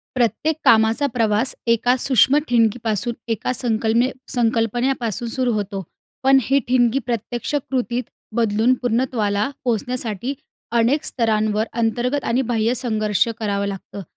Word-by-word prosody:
प्रत्येक 255 +6 +1
कामाचा 225 +5 +4
प्रवास 225 +1 +1 0.2
एका 245 +2 +2
सूक्ष्म 260 +2 +4
ठिणगीपासून, 230 -1 +1
एका 225 +2 -1
संकलने 230 0 +1 0.2
संकल्पनेपासून 235 0 0
सुरू 250 0 0
होतो. 200 -2 -3 0.4
पण 270 +1 +5
ही 270 +4 +2
ठिणगी 245 0 +3
प्रत्यक्ष 240 +3 -3
कृतीत 255 -3 -1 0.3
बदलून 225 +2 +2
पूर्णत्वाला 225 -4 0 0.2
पोहोचण्यासाठी, 245 +1 -2 0.4
अनेक 255 +6 +2
स्तरांवर 215 -2 0
अंतर्गत 240 +4 -1
आणि 250 +3 +1
बाह्य 225 +2 +1
संघर्ष 220 -4 0
करावं 200 -2 -1
लागतं. 200 0 -7
235 Hz, 115 wpm, -21 LUFS, 220-250 Hz, 0.4 s, पण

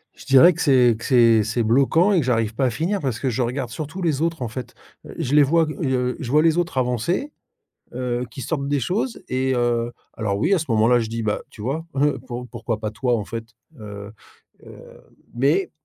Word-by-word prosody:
Je - - -14
dirais 150 +7 +7
que 175 - -6
c'est 125 -5 +4
que - - -10
c'est 115 -4 +5
c'est 110 +3 -1
bloquant 140 - +3
et 190 - +3
que 145 - -1
j'arrive 115 -3 0
pas 130 +3 0
à - - +3
finir 165 - -1
parce 130 -7 -3
que 130 - -1
je 125 +1 -2
regarde 125 +1 -2
surtout 155 +8 -6
les 155 -4 0
autres 165 -3 -1
en 120 - -2
fait, 125 +2 -8 0.3
heu, - - -10
je 145 -5 -2
les 150 - +7
vois, 165 +3 +3
g 155 - -5
heu, 125 -2 0
je 130 -5 -5
vois 150 - +5
les 165 0 +3
autres 175 -5 -1
avancer, 130 - -1 0.6
heu, 125 -1 -2
qui 135 - -9
sortent 140 0 -3
des 145 -1 0
choses, 210 - -2
et 130 +1 0
heu, 120 -1 0 0.2
alors 100 -3 -1
oui, 175 - +2
à - - +2
ce 160 - -4
moment-là, 115 +2 +4
je 110 - -3
dis: 115 +1 -4
«Bah, 105 -1 -1
tu - - -14
vois, 140 +9 -3
heu, 145 -1 +2
pour 125 0 -6
pourquoi 115 -3 -4
pas 110 -1 -3
toi, 120 +3 -1
en 105 - -3
fait?» 115 +2 -6 0.4
heu 105 -1 -9 0.5
heu, - - -12 0.6
mais, 140 +10 +1
125 Hz, 230 wpm, -22 LUFS, 115-150 Hz, 0.6 s, dirais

